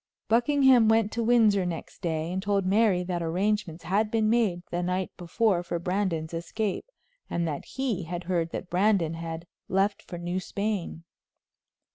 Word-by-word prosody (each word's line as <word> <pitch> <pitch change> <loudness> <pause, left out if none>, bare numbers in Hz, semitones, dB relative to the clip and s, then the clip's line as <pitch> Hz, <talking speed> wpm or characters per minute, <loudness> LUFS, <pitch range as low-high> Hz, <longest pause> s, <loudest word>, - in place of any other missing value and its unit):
Buckingham 250 0 +5
went 220 -1 +3
to 235 - -2
Windsor 220 -4 +4
next 175 -2 -6
day 160 -2 -2
and 190 - -1
told 200 -1 0
Mary 195 -2 +3
that 175 -1 -3
arrangements 185 +1 -1
had 210 +4 +1
been 220 -1 +2
made 210 -7 +1
the 175 - -1
night 180 +1 -1
before 185 +2 +1
for 175 -1 -3
Brandon's 175 -2 -2
escape, 185 +4 -3 0.4
and 170 -1 -1
that 150 -3 -4
he 240 -10 -2
had 175 +1 -5
heard 170 -2 0
that 180 - -5
Brandon 180 -3 +2
had 165 0 -6 0.2
left 195 +2 +1
for 175 - -8
New 175 +2 -2
Spain. 200 -3 -3
185 Hz, 160 wpm, -27 LUFS, 170-215 Hz, 0.4 s, Buckingham